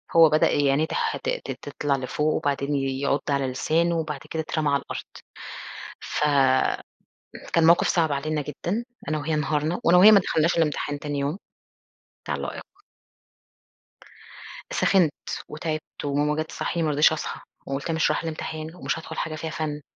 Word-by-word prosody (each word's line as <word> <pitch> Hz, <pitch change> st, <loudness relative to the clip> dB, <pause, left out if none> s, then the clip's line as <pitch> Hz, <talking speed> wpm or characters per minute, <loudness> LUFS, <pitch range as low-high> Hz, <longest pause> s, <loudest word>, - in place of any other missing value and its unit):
هو 165 Hz, -2 st, +8 dB
بدأ 155 Hz, -, +4 dB
ي 145 Hz, -1 st, +3 dB
عِنيه 150 Hz, +3 st, +2 dB
تح -, -, -1 dB
ت -, -, -4 dB
ت -, -, -3 dB, 0.2 s
تطلع 145 Hz, -2 st, 0 dB
لفوق 150 Hz, +4 st, -1 dB
وبعدين 140 Hz, 0 st, 0 dB
يعُض 135 Hz, +1 st, 0 dB
على 140 Hz, -1 st, +1 dB
لسانه 165 Hz, +6 st, +1 dB
وبعد 150 Hz, -3 st, -3 dB
كده 160 Hz, -, -2 dB
اترمى 155 Hz, -1 st, -1 dB
على 140 Hz, 0 st, +2 dB
الأرض. -, -, -6 dB, 1.0 s
ف -, -, -4 dB, 1.3 s
كان 165 Hz, -, +4 dB
موقف 170 Hz, -, +5 dB
صعب 165 Hz, -3 st, +2 dB
علينا 150 Hz, +2 st, -1 dB
جدًا 175 Hz, -, -3 dB, 0.2 s
أنا 155 Hz, -, 0 dB
وهي 155 Hz, +2 st, -2 dB
انهارنا 150 Hz, +3 st, 0 dB
وأنا 175 Hz, +2 st, +6 dB
وهي 200 Hz, +4 st, +9 dB
ما 210 Hz, -, +8 dB
دخلناش 165 Hz, -3 st, +1 dB
الأمتحان 150 Hz, -2 st, 0 dB
تاني 145 Hz, -1 st, -3 dB
يوم 145 Hz, +6 st, -1 dB, 0.9 s
بتاع -, -, -2 dB
اللائِق. -, -, -5 dB, 2.1 s
سخنت 180 Hz, -, +3 dB, 0.4 s
وتعبت 155 Hz, -1 st, -5 dB
وماما 145 Hz, +1 st, +1 dB
جات 155 Hz, +1 st, -2 dB
تصحّيني 170 Hz, -2 st, -2 dB
ما 155 Hz, -, +1 dB
رضيتش 150 Hz, +2 st, +5 dB
أصحى 150 Hz, -, -5 dB, 0.2 s
وقُلت 140 Hz, +4 st, -3 dB
مش 160 Hz, -1 st, +2 dB
رايحة -, -, -1 dB
الأمتحان 160 Hz, 0 st, -5 dB
ومش 180 Hz, -, -2 dB
هادخل 160 Hz, -, -8 dB
حاجة 155 Hz, -1 st, -2 dB
فيها 160 Hz, +1 st, -4 dB
فَن 150 Hz, -2 st, -3 dB
155 Hz, 160 wpm, -25 LUFS, 145-165 Hz, 2.1 s, وهي